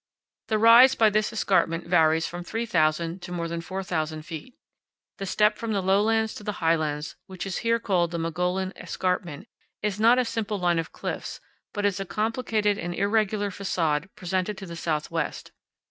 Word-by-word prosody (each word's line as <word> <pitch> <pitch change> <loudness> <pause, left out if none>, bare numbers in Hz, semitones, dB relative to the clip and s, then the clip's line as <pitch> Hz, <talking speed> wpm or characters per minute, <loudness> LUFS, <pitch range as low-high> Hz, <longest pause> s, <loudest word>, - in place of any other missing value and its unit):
The 220 - +1
rise 235 +4 +8
by 220 -2 +4
this 215 +1 +1
escarpment 185 -6 +1
varies 160 -2 +3
from 175 0 -6
3,000 170 -5 0
to 180 - -8
more 170 -1 -2
than 165 0 -4
4,000 165 -4 -3
feet. 165 +9 -8 0.6
The 195 - -4
step 210 +3 +2
from 230 -1 -2
the 200 - +1
lowlands 215 +3 +2
to - - -9
the 210 - -3
highlands 155 -2 0
which 185 -1 -6
is 190 -2 -3
here 230 0 +2
called 185 -7 +1
the 170 - -4
Mogollon 180 +3 -1
Escarpment 180 -1 -3 0.4
is 210 -1 -1
not 230 +3 +6
a 255 - +2
simple 220 -2 -2
line 175 -2 +1
of 165 - -4
cliffs, - - -5 0.3
but 205 -1 -2
is 200 -1 +1
a 195 - -3
complicated 215 -1 0
and 175 +1 -4
irregular 205 0 +1
facade 170 -4 -1
presented 185 +2 -2
to 195 - -7
the 170 -2 -8
southwest. 160 -1 -3
190 Hz, 175 wpm, -26 LUFS, 165-215 Hz, 0.6 s, rise